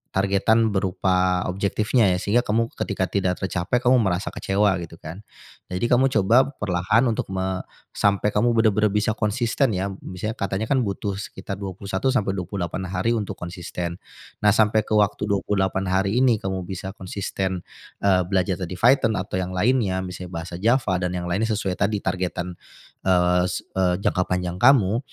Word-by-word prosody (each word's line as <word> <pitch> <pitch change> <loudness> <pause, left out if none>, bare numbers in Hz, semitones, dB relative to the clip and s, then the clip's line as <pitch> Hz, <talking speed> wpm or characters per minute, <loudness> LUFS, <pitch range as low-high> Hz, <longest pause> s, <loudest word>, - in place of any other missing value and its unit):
targetan 100 +3 +2
berupa 90 -1 +1
objektifnya, 100 +5 +1
ya, - - -1
sehingga 120 +6 +1
kamu 115 +1 +1
ketika 95 -3 -2
tidak 95 -2 -1
tercapai 95 +5 -1
kamu 125 +1 +5
merasa 95 -2 -1
kecewa 100 0 +1
gitu, 85 0 -11
kan. 85 +7 -9 0.5
Jadi 90 +6 -1
kamu 130 +2 +3
coba 120 +7 +4
perlahan 105 +5 +2
untuk 115 - -1
me 95 0 -2 0.3
sampai 100 0 +2
kamu 120 +3 +3
benar-benar 110 -2 +3
bisa 105 +1 0
konsisten, 115 +4 0
ya. 95 +2 -1 0.2
Misalnya 105 +5 -5
katanya, 100 +2 -2
kan, 130 -3 +3
butuh 100 0 -3
sekitar 100 0 -6
21 100 +5 -2
sampai 100 -6 0
28 95 0 -4
hari 95 +6 0
untuk 105 -3 -3
konsisten. 85 0 -5 0.4
Nah, 105 - +6
sampai 110 0 +3
ke - - -13
waktu 105 0 +2
28 95 -1 0
hari 95 +5 +1
ini 125 -5 +3
kamu 95 -2 -3
bisa 95 0 -5
konsisten, 95 -1 -4 0.4
eee, 95 -2 +4
belajar 95 -1 0
tadi 90 0 -4
Python 115 +2 +3
atau 95 -1 -3
yang 95 0 -4
lainnya, 100 -3 +1
misalnya 90 -1 -7
bahasa 85 0 -8
Java, 110 -4 +2
dan 90 0 -2
yang 90 - -3
lainnya 100 +6 0
sesuai 95 -2 -3
tadi 105 0 +1
targetan, 90 -1 -3 0.5
eee, 90 -1 +3
sek 90 - -4
eee, 90 -2 +2
jangka 90 -1 +1
panjang 90 0 -2
kamu. 120 -4 +5
95 Hz, 165 wpm, -23 LUFS, 90-110 Hz, 0.5 s, Nah